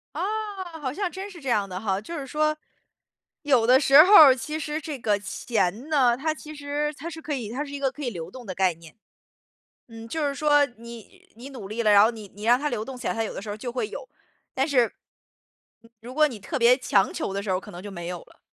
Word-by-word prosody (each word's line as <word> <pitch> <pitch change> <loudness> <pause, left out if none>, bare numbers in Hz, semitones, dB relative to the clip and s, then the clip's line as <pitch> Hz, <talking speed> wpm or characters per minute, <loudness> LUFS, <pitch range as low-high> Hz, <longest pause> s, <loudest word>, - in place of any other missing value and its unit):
啊， 385 -2 -4
好 260 -4 -3
像 380 +1 -2
真 385 +2 -7
是 365 -4 -12
这 270 - -4
样 210 -4 +1
的 185 0 -5
哈， 195 -2 -1
就 335 +10 -7
是 280 - -5
说， 305 +3 0 0.9
有 260 -6 +3
的 255 +2 +6
时 280 +1 +8
候 385 +4 +4
儿， 290 -8 +10
其 300 +4 -5
实 305 +1 -3
这 300 -2 -5
个 210 -3 +1
钱 215 - -2
呢， 260 -6 +4
它 310 +4 -1
其 305 0 -11
实 290 +1 -3
它 330 - -6
是 325 -1 -9
可 305 - -4
以 240 -7 -4
它 265 +5 -3
是 285 - -9
一 285 - -5
个 270 -1 0
可 295 +2 -9
以 250 - -1
流 170 -5 -7
动 250 +1 -11
的 185 -3 -6
概 190 -2 +2
念。 165 -1 -16 0.9
嗯， 225 -1 -11
就 300 +5 -1
是 280 - -3
说， 290 0 +4
你 235 -3 -13
你 245 +4 -10
努 250 -8 -9
力 215 +4 -3
了， 215 -2 +3
然 205 0 +8
后 225 - +3
你 220 -3 -10
你 205 - -10
让 240 +3 +4
它 295 +1 -1
流 215 - -3
动 265 0 -8
起 - - -5
来， - - 0
它 225 - -1
有 220 - -5
的 - - -6
时 210 - -8
候 205 - -3
儿 - - -13
就 240 +3 -5
会 255 - -2
有， - - -8 0.5
但 270 +2 0
是 250 -6 +2 1.1
如 245 +2 -9
果 305 0 +4
你 235 -5 -8
特 290 - -4
别 245 0 +5
强 200 -7 +1
求 195 - -3
的 200 0 -3
时 205 - -6
候， 185 -1 +1
可 205 - -12
能 175 -1 -9
就 205 - -7
没 175 -2 -7
有 175 0 -5
了。 - - -21
255 Hz, 280 characters per minute, -25 LUFS, 215-300 Hz, 1.1 s, 儿